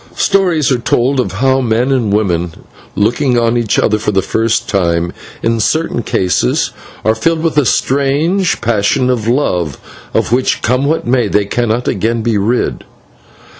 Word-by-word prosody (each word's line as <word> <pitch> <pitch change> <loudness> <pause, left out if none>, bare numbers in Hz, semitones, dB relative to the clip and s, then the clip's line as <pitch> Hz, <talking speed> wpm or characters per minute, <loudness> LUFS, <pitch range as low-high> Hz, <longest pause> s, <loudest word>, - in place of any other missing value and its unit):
Stories 175 -8 +1
are 125 - +1
told 130 +3 +1
of 95 -7 -1
how 130 +5 +1
men 120 +2 0
and 120 -6 +1
women, 90 -5 0 0.4
looking 120 +5 +1
on 115 0 +1
each 120 -3 0
other 110 -1 +2
for 105 - -2
the 95 -2 +1
first 115 +2 0
time, 85 -3 0 0.3
in 115 0 +1
certain 155 +2 0
cases 90 - 0 0.3
are 110 - +4
filled 160 +8 -1
with 165 -3 0
a 150 -4 +3
strange 145 +8 +1
passion 115 +3 +1
of 115 -3 -2
love, 90 - 0 0.4
of - - 0
which, 130 +2 +1
come 125 +4 +1
what 160 +3 0
may, 125 0 +1
they 105 0 +1
can 120 +3 -1
not 120 +3 -1
again 115 +3 -1
be 115 -1 0
rid. 110 +5 -1
120 Hz, 170 wpm, -14 LUFS, 105-135 Hz, 0.4 s, are